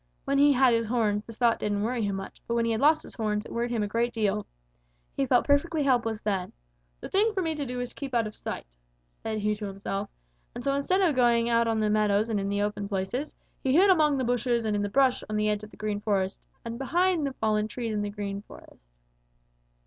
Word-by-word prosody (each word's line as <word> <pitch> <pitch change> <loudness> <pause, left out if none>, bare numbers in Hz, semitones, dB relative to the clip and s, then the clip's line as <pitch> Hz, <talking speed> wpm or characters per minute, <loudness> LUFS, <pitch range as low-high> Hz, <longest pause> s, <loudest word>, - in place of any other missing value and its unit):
When 275 0 +1
he 290 +1 +6
had 260 -2 +4
his 230 -1 +1
horns, 215 -3 +1
this 225 +1 -12
thought 235 -2 +3
didn't 205 -1 -1
worry 240 +1 -1
him 200 -2 -1
much, 195 0 -8
but 235 - -1
when 235 0 +2
he 230 - +1
had 220 - -1
lost 310 +2 +4
his - - -10
horns, 210 -1 -2
it - - -10
worried 235 +1 -1
him 230 -3 0
a - - -1
great 235 +3 0
deal. 210 -2 -1 0.7
He 270 - 0
felt 245 -1 +3
perfectly 295 +2 +2
helpless 235 -5 +1
then. 195 -4 -2 0.5
'The - - -7
thing 420 +3 +3
for 380 - 0
me 325 -1 0
to 290 -3 -4
do 250 0 -4
is 245 0 -3
to - - -14
keep 270 -3 -5
out 230 -2 +2
of 215 - -6
sight,' - - -7 0.5
said 220 -1 -3
he 210 0 0
to 210 0 -5
himself, 195 +1 -4 0.5
and 240 - -6
so 275 - +1
instead 325 +8 +1
of 335 -7 +3
going 235 -2 +3
out 230 0 +3
on 225 -1 +1
the 215 -1 +1
meadows 210 +1 +2
and 210 - +1
in 195 0 -2
the 200 0 0
open 205 -1 -3
places, 205 +9 -3 0.3
he 265 - +1
hid 380 +6 +6
among 305 -5 +3
the 260 - 0
bushes 240 -1 0
and 215 -1 0
in 205 - 0
the 205 - -1
brush 260 +3 +3
on 215 - -2
the 210 0 +1
edge 210 0 -1
of 210 - -9
the - - -17
Green 210 -1 -2
Forest 195 -2 -1 0.2
and 230 +1 -5
behind 350 +4 +1
the 270 - -4
fallen 215 -3 0
trees 230 0 -4
in 210 - -1
the 205 - -2
Green 200 -1 -5
Forest. - - -16
230 Hz, 255 wpm, -27 LUFS, 210-265 Hz, 0.7 s, he